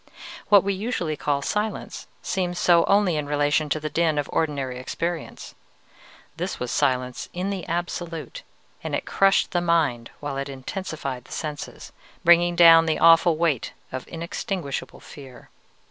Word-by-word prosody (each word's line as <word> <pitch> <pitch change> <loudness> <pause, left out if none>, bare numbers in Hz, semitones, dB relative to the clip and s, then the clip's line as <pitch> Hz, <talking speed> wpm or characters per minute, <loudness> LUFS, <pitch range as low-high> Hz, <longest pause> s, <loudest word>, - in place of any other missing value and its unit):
What 205 -2 +7
we 200 0 0
usually 190 -6 -2
call 140 -1 -1
silence 210 +5 -3 0.2
seems 180 -2 -2
so 170 -1 +4
only 195 -5 +3
in 150 -1 -3
relation 145 +1 +1
to 155 - 0
the 155 - -4
din 160 0 +1
of 145 - -1
ordinary 140 -5 -1
experience. 165 +6 -5 0.8
This - - -4
was 125 -1 -3
silence 125 -1 -1
in 185 +3 -2
the 190 -3 -5
absolute, 175 - -4 0.4
and - - -2
it - - -3
crushed 195 0 +2
the 175 - +1
mind 155 -9 +1
while 145 -2 -4
it 140 +1 -4
intensified 135 -2 -5
the - - -17
senses, 150 -2 -6 0.3
bringing 175 0 +5
down 165 -1 +7
the 160 - +1
awful 165 0 +5
weight 155 -7 0 0.2
of 130 0 -6
inextinguishable 170 -2 -5
fear. 135 -4 -13
165 Hz, 150 wpm, -24 LUFS, 145-175 Hz, 0.8 s, What